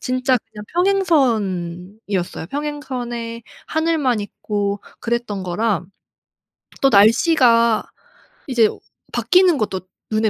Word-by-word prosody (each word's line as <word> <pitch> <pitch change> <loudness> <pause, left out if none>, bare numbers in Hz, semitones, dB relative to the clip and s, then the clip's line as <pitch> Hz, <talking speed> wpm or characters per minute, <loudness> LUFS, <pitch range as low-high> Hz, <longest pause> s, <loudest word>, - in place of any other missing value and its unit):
진짜 255 0 +1 0.2
그냥 210 -1 -9
평행선이었어요. 205 - 0
평행선에 250 -6 -5 0.2
하늘만 315 -8 +1
있고 205 -1 -3 0.2
그랬던 235 -4 -2
거랑 190 0 -1 0.9
또 275 - +5
날씨가 230 +1 +4 0.6
이제 245 -4 +3
오 - - -8 0.3
바뀌는 365 -3 +4
것도 200 -3 -2 0.3
눈에 215 0 +2
230 Hz, 225 characters per minute, -20 LUFS, 205-275 Hz, 0.9 s, 또